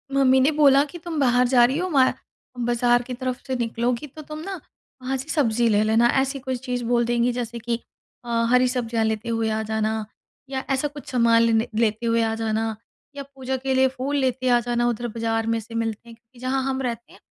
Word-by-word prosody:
mummy 265 -1 +5
ने 275 +4 +4
बोला 285 -2 +5
कि, 345 +4 -10
"तुम 330 -2 -5
बाहर 250 -2 +3
जा 245 -1 +5
रही 265 +5 0
हो, 365 +1 -1
वा 265 -5 +4 0.5
बाज़ार 240 0 +3
की 250 - -6
तरफ़ 255 0 -4
से 260 - -1
निकलोगी, 235 +3 -1
तो 310 +3 -11
तुम 305 +1 -8
ना 385 -2 -5 0.4
वहाँ 265 +1 -2
से 275 +5 -8
सब्ज़ी 240 -7 +2
ले 210 0 +3
लेना", 225 +2 +4
ऐसी 270 +1 -2
कुछ 260 -1 -4
चीज़ 245 -1 -2
बोल 235 0 +1
देंगी, 240 +1 +1
जैसे 235 -1 -4
कि 235 +1 -2 0.4
अ, 240 - -9 0.2
हरी 250 0 +4
सब्ज़ियाँ 235 -3 -1
लेते 220 +1 -2
हुए 225 -1 0
आ 220 0 -1
जाना, 220 0 -1 0.4
या 265 -1 -3
ऐसा 270 +2 +1
कुछ 290 0 -11
सामान 230 -2 +4
लेने 225 0 +2
लेते 220 +1 +1
हुए 230 0 +2
आ 225 0 0
जाना, 220 0 -1 0.4
या 280 - -5
पूजा 265 0 -3
के 265 +1 -2
लिए 265 0 +4
फूल 265 +2 -3
लेते 255 -1 0
आ 240 0 +5
जाना, 240 0 0
उधर 240 0 -2
बाज़ार 225 0 -2
में 230 0 +1
से 225 +1 -12
मिलते 230 0 -3
हैं, 230 - -12
क्योंकि 235 +2 -23
जहाँ 260 +1 -1
हम 265 0 -2
रहते 235 -2 -4
हैं, - - -17
245 Hz, 225 wpm, -23 LUFS, 230-265 Hz, 0.5 s, mummy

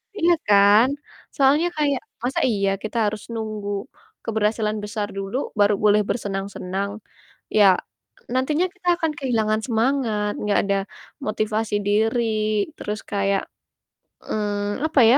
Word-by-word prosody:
Iya 345 -3 +4
kan? 205 +3 +6 0.5
Soalnya 290 +5 +4
kayak 285 -3 +1 0.2
masa 255 +2 0
iya 200 -3 +1
kita 215 - -4
harus 210 -1 -6
nunggu 215 -2 -4 0.5
keberhasilan 215 0 0
besar 210 0 -3
dulu, 195 +4 -4 0.2
baru 205 0 +5
boleh 210 0 +5
bersenang-senang. 195 -2 -3 0.7
Ya. 195 -3 +6 0.6
nantinya 295 +7 +2
kita 370 -3 -6
akan 325 -3 0
kehilangan 220 -5 +1
semangat, 225 -3 +1 0.2
gak 205 - +4
ada 200 0 +2 0.4
motivasi 215 0 -1
diri, 215 0 +1
terus 210 +1 -4
kayak, 200 -1 0 0.8
mmm, 205 +1 -2
apa 315 -3 +2
ya, 235 +4 +7
215 Hz, 120 wpm, -23 LUFS, 205-245 Hz, 0.8 s, ya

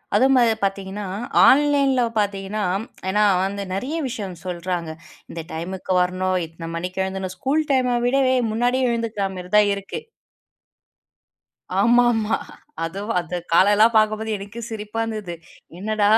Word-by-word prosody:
அது 260 - +5 0.4
பாத்தீங்கன்னா 195 +1 -2 0.4
ஆன்லைன்ல 280 -2 +4 0.2
பாத்தீங்கன்னா. 200 +1 -2 0.5
ஏன்னா 210 +2 +2 0.5
நிறைய 255 +11 -3
விஷயம் 205 -8 -5
சொல்றாங்க. 175 -1 -3 0.4
இந்த 165 - -6
டைம்க்கு 185 +3 -4
வரணும். 185 +1 0
இத்தனை 165 +1 -9
மணிக்கு 180 +3 -3
எழுந்து 190 -1 -4
ஸ்கூல் 285 +8 +1
டைம் 255 -2 +2 0.2
விடவே 260 0 +3 0.2
முன்னாடியே 245 +3 +1
எழுந்துக்குற 230 -3 -2
மாரிதான் 205 +3 +3
இருக்கு. 200 - -6 1.8
ஆமாமா. 235 -1 +3 0.5
அதுவும் 195 +5 -3
அந்த 175 +1 -5 0.2
கால 190 +4 +6
எல்லாம் 225 +2 +5
பாக்கும்போது 215 0 +2
எனக்கும் 205 +4 -8
சிரிப்பா 215 0 -4
இருந்தது. 215 -6 -5 0.4
என்னடா 210 +1 +1
210 Hz, 115 wpm, -22 LUFS, 185-235 Hz, 1.8 s, கால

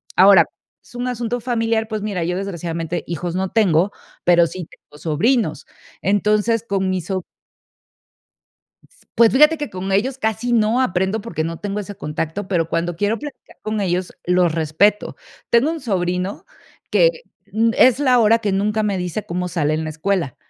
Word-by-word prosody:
ahora, 195 +1 +7 0.4
es - - -19
un 245 +1 -3
asunto 245 -1 -2
familiar, 225 -2 0
pues 215 -2 -3
mira, 200 -5 -2
yo 180 +2 -1
desgraciadamente 170 -3 -4
hijos 170 +1 -4
no 190 0 -1
tengo, 195 -4 +3 0.3
pero 175 -1 +5
sí 175 +1 -7
tengo 150 - -19
sobrinos. 210 - 0 0.4
Entonces, 210 +3 +1
con 190 -1 0
mis 185 -3 -2
so 190 -2 -2 1.7
S - - -28
pues, 230 -1 +5
fíjate 300 +4 +5
que 295 -1 -3
con 185 +1 -4
ellos 250 +7 0
casi 220 +1 -1
no 225 +1 +3
aprendo 190 -2 0
porque 200 -7 -4
no 165 0 -4
tengo 205 0 -4
ese 205 0 -7
contacto, 160 +4 -4
pero 170 -4 0
cuando 170 0 -2
quiero 205 +5 0
platicar 295 -1 -11
con 215 0 -2
ellos, 180 -1 -1
los 180 -1 +2
respeto. 165 +6 +1 0.3
Tengo 235 +6 +4
un 330 -1 -4
sobrino 180 -4 -2 0.5
que, - - +5 0.4
mm, 225 +2 +2
es 255 0 +5
la 255 -3 +4
hora 225 0 +5
que 210 -3 -2
nunca 210 +3 0
me 205 -2 0
dice 180 +3 -4
cómo 180 +1 -3
sale 155 -3 0
en 160 - -2
la 155 - -4
escuela, 165 -2 -2
200 Hz, 175 wpm, -20 LUFS, 175-225 Hz, 1.7 s, ahora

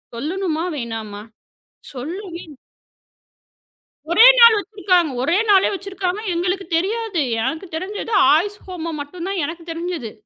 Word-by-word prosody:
சொல்லணுமா? 325 +4 -2
வேணாமா? 220 -4 -6 0.7
சொல்லவே 340 +7 -6
இல்ல. 290 - -13 1.5
ஒரே 445 +8 +7
நாள் 465 -2 +9
வச்சிருக்காங்க. 370 -5 +1
ஒரே 335 +8 +2
நாளே 390 -2 +5
வச்சிருக்காங்க, 385 +1 -4
எங்களுக்குத் 360 0 -2
தெரியாது. 405 -1 -1 0.2
எனக்குத் 320 +6 -4
தெரிஞ்சது 410 +5 -5 0.2
ஆயுஷ் 410 +6 -1
ஹோமம் 335 -4 -5
மட்டும் 345 +5 -8
தான் 385 -5 -2
எனக்குத் 335 0 -8
தெரிஞ்சது. 330 -9 -5
350 Hz, 115 wpm, -20 LUFS, 320-390 Hz, 1.5 s, நாள்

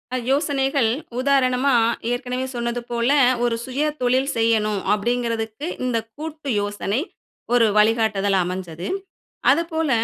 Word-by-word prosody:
அ - - +1
யோசனைகள் 275 -3 +1 0.3
உதாரணமா 265 0 +2 0.4
ஏற்கனவே 250 +1 -2
சொன்னது 235 0 -2
போல 235 +2 +1 0.3
ஒரு 235 -1 +1
சுய 265 +3 -3 0.2
தொழில் 260 +3 +2
செய்யணும் 215 -3 +2
அப்படிங்குறதுக்கு, 230 +3 -2 0.2
இந்த 240 -2 0 0.2
கூட்டு 310 -2 -6
யோசனை 205 +4 -2 0.5
ஒரு 235 -2 +5
வழிகாட்டுதலா 210 -3 +3
அமைஞ்சது. 180 -2 -5 0.6
அதுப்போல 325 0 0
245 Hz, 110 wpm, -22 LUFS, 220-270 Hz, 0.6 s, ஒரு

